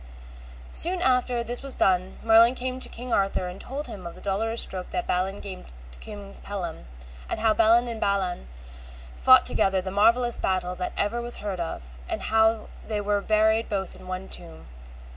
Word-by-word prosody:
Soon 360 +2 +4
after 250 -4 +1
this 240 +1 -1
was 275 -1 -4
done 185 0 +1
Merlin 230 +2 +6
came 255 0 -4
to - - +2
King 245 +1 -6
Arthur 195 -2 +1
and 180 +1 -7
told 280 +4 -5
him 185 -4 -8
of 170 - -9
the - - -12
dolorous 225 +4 -1
stroke 185 -1 -5
that 355 - -3
Balin 190 +2 -1
gave 190 -2 -8 0.2
to - - -13
King 205 -2 -9
Pellam, 180 - -5 0.4
and - - -3
how 220 -1 +3
Balin 230 +2 +4
and 230 -2 -5
Balan 190 - -1 0.7
fought 60 0 +6
together 195 -1 +3
the 190 0 -5
marvellest 235 +4 +2
battle 185 -1 0
that 180 - -4
ever 230 +4 +1
was 240 0 -2
heard 200 -3 -4
of, 65 - -6
and - - -3
how 220 0 +2 0.2
they 215 -2 -2
were 205 0 0
buried 220 +2 +2
both 195 -2 -3
in 185 - -13
one 185 +1 -5
tomb. 165 -2 -4
205 Hz, 185 wpm, -25 LUFS, 185-235 Hz, 0.7 s, Merlin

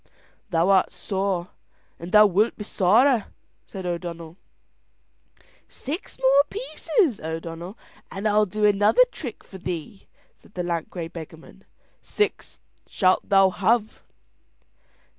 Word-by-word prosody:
"Thou 170 0 +2
art 190 -2 +4
sore, 190 -1 -3 0.5
and 170 +2 -8
thou 210 0 +8
wilt 205 +3 +2
be 210 - -6
sorer," 220 +5 +3 0.4
said 190 -2 -8
O'Donnell. 170 -2 -5 1.3
"Six 310 +9 -7
more 270 +2 +5
pieces, 410 - -1
O'Donnell, 165 +5 -6 0.3
and 195 +3 -3
I'll 210 0 +3
do 210 +3 -1
another 210 - +5
trick 250 -8 -8
for 190 - -12
thee," 180 +1 -6 0.3
said - - -23
the 180 - -2
lank 170 -2 -3
grey 170 -3 -6
beggarman. 165 +3 -12 0.4
"Six 420 - -3 0.3
shalt 185 -2 +1
thou 195 -1 +5
have." 215 +4 0
195 Hz, 120 wpm, -24 LUFS, 175-215 Hz, 1.3 s, thou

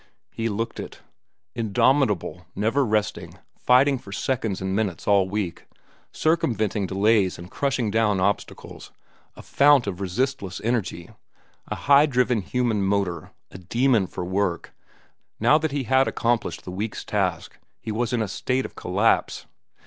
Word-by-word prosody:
He 115 0 -2
looked 115 +2 -3
it. - - -8 0.5
Indomitable, 110 - +1
never 115 +8 +1
resting, 110 -3 -2 0.2
fighting 130 +2 +3
for 100 - -13
seconds 110 -1 -2
and 95 0 -2
minutes 100 -5 -2
all 100 -2 +3
week, 100 -4 -4 0.4
circumventing 110 - 0
delays 100 0 +2
and 90 +2 -11
crushing 135 -6 -1
down 105 -3 +2
obstacles, 100 +2 -3 0.4
a - - -12
fount 145 -3 +4
of 100 -2 -5
resistless 100 0 -2
energy, 110 -7 -2 0.6
a - - -3
high 145 +2 +5
driven 125 -4 +1
human 115 +2 -1
motor, 95 -4 -1 0.2
a - - -10
demon 115 +2 +1
for 90 - -6
work, 95 -1 -2 0.7
now 150 - +4
that 160 -1 -2
he 140 -1 -2
had 130 +2 +3
accomplished 120 -1 -1
the 90 - -7
week's 105 +3 -4
task - - -2 0.2
he 110 - -5
was 115 +2 -1
in 120 -3 0
a - - -3
state 125 +6 -1
of - - -8
collapse. - - 0
110 Hz, 145 wpm, -24 LUFS, 95-125 Hz, 0.7 s, high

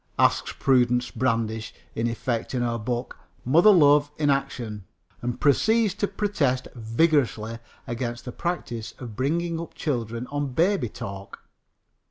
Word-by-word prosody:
asks - - +3
Prudence 125 -2 +3
Brandish 115 -3 -1 0.2
in 115 +1 -1
effect 115 +1 -2
in 125 - +1
her 115 -1 -1
book 120 +2 -4 0.3
Mother 165 - +6
Love 145 -6 +6
in 145 -2 +3
Action, 120 -7 -2 0.4
and 120 0 -3
proceeds 215 - +3
to 205 +1 -1
protest 145 -14 0
vigorously 115 -2 +1 0.3
against 120 -2 -4
the 125 - -5
practice 120 -9 -4
of 120 -5 -8
bringing 165 +6 0
up 170 - -9
children 115 -4 -2
on 145 -2 -2
baby 175 - +2
talk. 100 -1 -8
125 Hz, 135 wpm, -25 LUFS, 115-150 Hz, 0.4 s, Mother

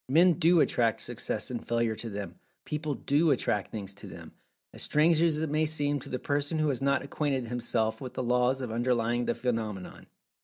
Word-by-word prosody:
Men 170 +4 +5
do 170 0 +5
attract 115 -3 +2
Success - - -2
and - - -4
Failure 115 -1 0
to 115 - -4
them—people 145 +8 -6
do 150 +4 +2
attract 105 -7 0
things 100 -3 -6
to 100 - -10
them—as - - -12
strange 160 +2 +3
as 160 -2 +2
it 160 - -1
may 155 +1 +2
seem 145 -2 0
to - - -10
the 125 - -2
person 145 +4 -1
who 155 -1 +2
has 135 -2 -1
not 140 0 +2
acquainted 140 -2 -1
himself 115 -1 -1
with 130 -2 -7
the - - -2
laws 125 +2 +2
underlying 120 0 0
the - - 0
phenomenon. 110 -6 -4
130 Hz, 185 wpm, -29 LUFS, 115-150 Hz, -, Men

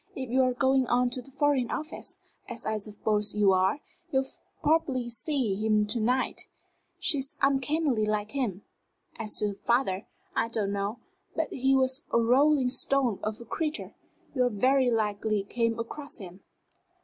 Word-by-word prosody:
If 260 -3 -5
you're 255 0 +3
going 265 0 +2
on 245 0 +2
to 255 - -1
the 250 - -16
Foreign 275 -2 +1
Office, 310 +1 -6 0.3
as 235 -1 -4
I 220 0 0
suppose 210 0 -2
you 205 -2 +4
are, 190 +9 +2 0.3
you'll 265 0 +2 0.4
probably 275 -6 +1
see 240 -1 -1
him 215 -1 +3
to 215 +3 -1
night. 250 +4 0 0.5
She 355 -5 +3
is 270 +1 -3
uncannily 275 -3 +2
like 210 0 -1
him. 230 -9 -2 0.5
As 215 -2 -2
to 210 - 0
her - - -4
father, 210 -2 0 0.3
I - - +2
don't 215 -3 -1
know 200 +3 -2 0.4
but - - -1
he 270 +1 +2
was 260 +2 +3
a - - +4
rolling 260 +3 +4
stone 255 -4 +2
of 215 +1 -3
a - - -9
creature; 310 +6 -3 0.4
you 250 -2 +2
very 255 +4 +3
likely 215 -2 0
came 230 +2 -1
across 280 +5 -6
him." 185 -2 -10
245 Hz, 160 wpm, -28 LUFS, 215-270 Hz, 0.5 s, you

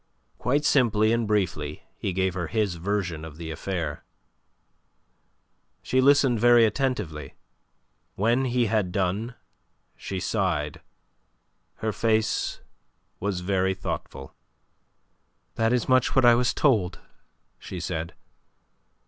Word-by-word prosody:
Quite 145 +5 +1
simply 110 -5 +3
and 115 -1 0
briefly 85 -8 -1
he 95 - -3
gave 95 0 0
her 85 -3 -3
his 105 -1 0
version 90 -2 -2
of 80 -2 -9
the 80 -1 -6
affair. 80 -2 -4 1.8
She 130 - +2
listened 135 -3 +4
very 120 0 +6
attentively. 105 - -2 0.8
When 120 +6 +2
he 125 -1 +1
had 105 -4 0
done 100 +6 -1 0.6
she 95 - -5
sighed; 90 -6 -1 1.0
her 110 - +1
face 110 0 0 0.6
was 95 -2 -2
very 95 0 0
thoughtful. 70 -7 -6 1.2
"That 115 0 +1
is 125 -2 +1
much 130 -1 +3
what 130 -2 +5
I 120 - +8
was 120 +1 +2
told," 105 - +1 0.6
she 90 - -7
said. 85 -1 -4
100 Hz, 115 wpm, -26 LUFS, 90-120 Hz, 1.8 s, I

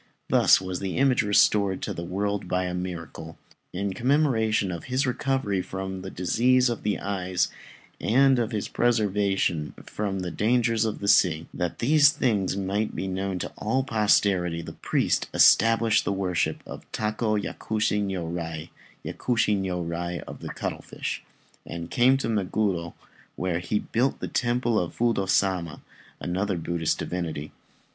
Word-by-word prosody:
Thus - - +6
was 95 -1 -4
the 95 -2 -3
image 130 -1 +3
restored 100 -2 +3
to - - -2
the 85 - -5
world 100 +2 -2
by 90 +1 0
a 90 - -3
miracle. 85 -3 -6 0.3
In 100 +1 -2
commemoration 115 -6 +1
of 85 -2 -6
his 130 +2 0
recovery 125 -6 0
from 95 0 -5
the 95 - -6
disease 125 +8 +2
of 120 - -3
the 105 -1 0
eyes 95 -2 -1 0.5
and 135 +3 +4
of 115 0 -1
his 105 -3 -2
preservation 100 -8 0
from 100 -2 -3
the 90 -1 -4
dangers 115 +2 +2
of 110 - -3
the 100 - -3
sea, 85 -5 +4
that 90 -2 -3
these 145 +3 +5
things 105 - 0
might 100 +2 -1
be - - -3
known 95 0 -2
to - - -4
all 130 0 0
posterity, 100 -8 +2
the - - -8
priest - - 0
established 115 0 +5
the - - -1
worship 95 -3 -1
of - - -10
Tako 110 0 -1
Yakushi 105 0 -1
Niurai 85 -4 -4 0.4
("Yakushi 115 -4 +1
Niurai 85 -2 -3
of - - -10
the - - -7
Cuttlefish") - - -5 0.4
and 85 0 -7
came 130 +2 +4
to 135 - -3
Meguro, 95 -5 -1 0.4
where 90 -1 -1
he 90 +4 -1
built 125 +5 0
the - - -4
Temple 120 -2 +1
of 90 - -4
Fudô 115 -5 +1
Sama, 90 -5 +1 0.4
another 95 +2 -1
Buddhist 85 -1 -1
divinity. 80 -4 -4
100 Hz, 150 wpm, -26 LUFS, 90-115 Hz, 0.5 s, Thus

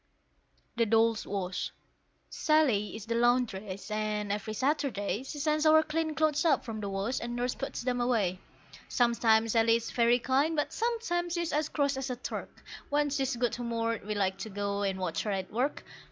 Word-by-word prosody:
THE 230 -1 +3
DOLLS' 225 0 +2
WASH. 185 -2 -2 0.6
Sally 260 -11 +2
is 220 -2 -7
the 230 - -2
laundress, 220 -5 0
and 210 -1 -1
every 210 +1 -3
Saturday 255 -5 0
She 270 +3 -7
sends 305 +1 +1
our 315 0 +6
clean 315 0 -2
clothes 310 -1 +2
up 310 -5 +2
from 225 -2 -5
the 200 - -3
wash, 195 +6 -1
and 240 0 -4
Nurse 245 +1 -1
puts 275 -2 -5
them 245 -1 0
away. 210 -7 +1 0.5
Sometimes 230 -2 +3
Sally 230 0 +4
is 230 0 -3
very 235 0 +4
kind, 270 +6 +1
but 295 - -1
sometimes 445 -8 -1
she's 340 -2 -1
as 300 0 0
cross 280 -2 0
as 265 0 -3
a 250 - -2
Turk; 245 - -7 0.3
When 290 0 +1
she's 270 -2 0
good 240 0 0
humoured 230 -2 -2
we 210 +1 -3
like 190 -1 0
to 220 - -5
go 200 0 -2
and 195 -1 0
watch 180 -3 -2
her 215 - -3
at 190 -1 -3
work. 255 +6 -1
235 Hz, 185 wpm, -30 LUFS, 210-285 Hz, 0.6 s, our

